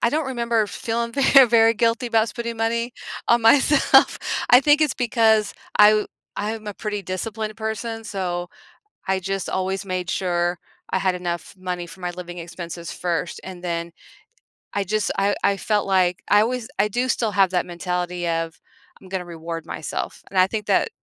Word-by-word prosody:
I - - +3
don't 300 +3 -1
remember 235 -4 0
feeling 230 +3 -3
very, 275 0 +6
very 230 -1 +5
guilty 230 +2 +1
about 225 -1 +2
spending 235 -1 -5
money 230 +2 -1 0.4
on 235 0 +4
myself. 275 +5 +5 0.3
I 245 - +9
think 295 +2 +4
it's 300 -3 +2
because 220 -3 +2 0.3
I 210 0 +9
w 215 0 +1 0.3
I 210 +2 -2
am 220 -1 -10
a 210 - -3
pretty 210 -2 -4
disciplined 215 +4 -4
person, 225 +1 -4
so 180 -4 -3 0.6
I 190 0 +1
just 195 0 -3
always 190 +1 -2
made 185 -2 -3
sure 175 -2 0 0.3
I - - +1
had 185 -1 +1
enough 175 -1 -4
money 180 -1 -4
for 170 +3 -13
my 180 -1 -2
living 175 0 -8
expenses 170 0 -7
first 175 -1 -3
and 180 -1 -9
then 170 -1 -3 0.8
I 200 - -1
just 210 +2 0
I 200 +1 +2
I 200 0 +3
felt 210 +1 0
like 185 -2 +2
I 205 +1 +5
was 245 0 -3
I 200 +2 +3
do 245 +5 -1
still 225 -3 0
have 195 -1 +4
that 180 -1 0
mentality 180 0 -3
of 165 -1 -2 0.4
"I'm 190 - -14
gonna 185 -1 -3
reward 165 -1 -6
myself," - - -5
and 195 - -2
I 185 - +6
think 210 +1 -4
that - - +2
200 Hz, 185 wpm, -22 LUFS, 180-225 Hz, 0.8 s, I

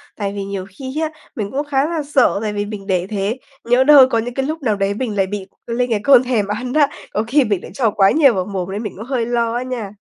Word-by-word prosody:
Tại 200 -1 -3
vì 200 -1 -4
nhiều 195 -1 -5
khi 260 +9 -6
á 315 - 0 0.3
mình 205 -3 -4
cũng 285 +3 -2
khá 275 -1 +1
là 330 -3 -2
sợ, 280 -7 +2
tại 215 -1 -2
vì 205 0 -2
mình 205 -1 -8
để 185 -1 0
thế 205 +3 -2 0.3
nhỡ 245 +2 +3
đâu 285 -1 +8
có 235 - +1
những 240 +2 -4
cái 270 +1 -1
lúc 310 +3 -4
nào 220 -5 +1
đấy 200 0 0
mình 220 -1 -3
lại 195 -1 +2
bị 195 -1 -5 0.2
lên 245 +1 -1
cái 215 - +2
cơn 265 -3 +6
thèm 235 -6 0
ăn 245 +5 -3
á, 295 -2 +4 0.3
có 210 - 0
khi 280 +4 +3
mình 205 -5 -1
lại - - -9
cho 235 -5 +1
quá 195 -1 +4
nhiều 285 -5 +5
vào 185 -3 -1
mồm 190 -2 -4
nên 205 +3 -4
mình 210 - -5
cũng 220 - -7
hơi 255 -3 -1
lo 235 -1 0
á 245 - -1
nha. 240 -6 -5
230 Hz, 285 wpm, -19 LUFS, 200-260 Hz, 0.3 s, đâu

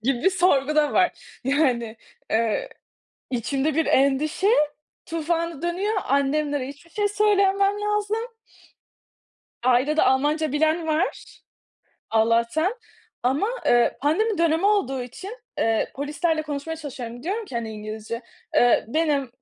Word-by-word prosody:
gibi 265 +7 +2
sorgu 305 -6 +2
da 300 -1 +3
var. 365 -1 0
Yani, 250 -5 +1 0.3
eee, 220 -1 0 0.6
içimde 270 +5 -1
bir 325 0 +2
endişe 280 +7 +2 0.6
tufanı 330 -1 -2
dönüyor, 360 +5 -1
annemlere 280 0 0
hiçbir 285 +4 -12
şey 415 +4 0
söylememem 400 -1 +2
lazım. 420 +2 -1 1.4
Ailede 255 +5 +3
Almanca 295 +3 +2
bilen 315 +3 +1
var, 315 +3 -2 0.7
Allah'tan 230 - +2 0.5
ama, 265 +10 +1 0.2
eee, 240 0 +4
pandemi 390 +7 +1
dönemi 335 +2 +2
olduğu 270 -12 +1
için, 385 - -9 0.2
eee, 225 -1 +1
polislerle 310 +3 -1
konuşmaya 300 +1 -4
çalışıyorum. 245 -6 -7
Diyorum 410 +8 -2
ki, 320 - -11
hani, 230 -2 -3
İngilizce, 215 +2 -6 0.3
eee, 245 -1 +4
benim, 300 0 +1
e - - -15
300 Hz, 115 wpm, -24 LUFS, 255-350 Hz, 1.4 s, eee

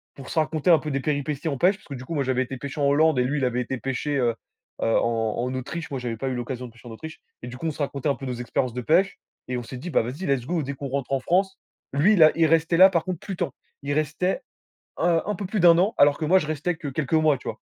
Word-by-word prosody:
pour 135 -2 -10
se 170 - -6
raconter 155 +2 0
un 165 -3 +7
peu 150 +1 -5
des 135 - 0
péripéties 145 +1 -2
en 140 -4 -1
pêche. 185 +8 +4
Parce - - -22
que 140 - -7
du 130 -1 -7
coup 165 - -5
moi, 140 - +1
j'avais 130 0 +1
été 130 +1 -7
pêcher 140 +3 -6
en 140 - +3
Hollande 150 -1 +3
et - - +3
lui 140 +4 -1
il 130 - +1
avait 125 0 0
été 130 +1 -3
pêcher, 135 +3 -2
heu 120 -3 +1 0.5
heu, 115 - +2
en 115 -2 0
en 130 - -3
Autriche. 150 +6 -5
Moi 135 - -3
j'avais 115 -2 -3
pas 135 - -3
eu 130 - -1
l'occasion 125 +1 -4
de - - -14
pêcher 115 +1 -15
en - - -8
Autriche 160 +8 -9 0.2
et 120 - -7
du 125 - -7
coup 165 - -3
on - - 0
se 150 - -12
racontait 140 0 -2
un 140 - +1
peu 135 - -8
nos 125 - -3
expériences 125 0 -2
de 125 - -3
pêche 180 +9 +2 0.3
et 125 - -1
on 120 - -4
s'est 130 - -9
dit: 155 +8 -6
«Bah 135 - +2
vas-y 135 +11 -5
let's 135 -3 0
go, 165 -1 -1
dès 140 - -4
qu'on 140 +1 -6
rentre 135 0 -3
en 135 - +2
France». 190 +6 0 0.3
Lui 170 +10 +4
là, 155 -4 +7
il 165 -1 +4
restait 165 +1 +3
là 190 +2 +9
par 170 -4 0
contre 185 -3 -4
plus 195 - -6
temps. 140 - -3 0.3
Il 140 +1 -3
restait 155 - 0 0.6
un 165 -1 +2
un 210 - -1
peu 195 - -5
plus 210 +1 -2
de 175 - +6
1 170 - +7
an 200 +5 +2
alors 145 0 +5
que 155 - -1
moi 185 +5 +5
je 150 - -4
restais 155 +3 -1
que 155 - -7
quelques 140 +2 -3
mois, 155 -3 +4
tu - - -11
vois? - - -4
145 Hz, 310 wpm, -24 LUFS, 130-165 Hz, 0.6 s, là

